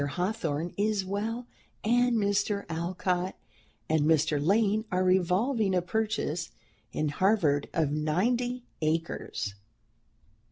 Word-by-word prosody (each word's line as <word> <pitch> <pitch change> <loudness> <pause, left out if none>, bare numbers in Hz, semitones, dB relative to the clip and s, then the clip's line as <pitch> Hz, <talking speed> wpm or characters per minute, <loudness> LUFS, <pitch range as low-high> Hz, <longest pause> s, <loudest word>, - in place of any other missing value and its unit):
Hawthorne 175 -4 -2
is 205 -1 +1
well, 220 +5 -3 0.4
and 245 +1 +3
Mr. 205 0 +1
Alcott 180 +2 -1 0.5
and 160 -1 +2
Mr. 150 -1 +2
Lane 210 +4 +3
are 185 +1 +2
revolving 190 +4 +2
a 180 - +3
purchase 180 -5 -1 0.4
in 155 0 -1
Harvard 160 -4 +2
of 155 -4 +1
ninety 235 +12 0 0.2
acres." 155 -9 -2
185 Hz, 105 wpm, -29 LUFS, 160-215 Hz, 0.5 s, and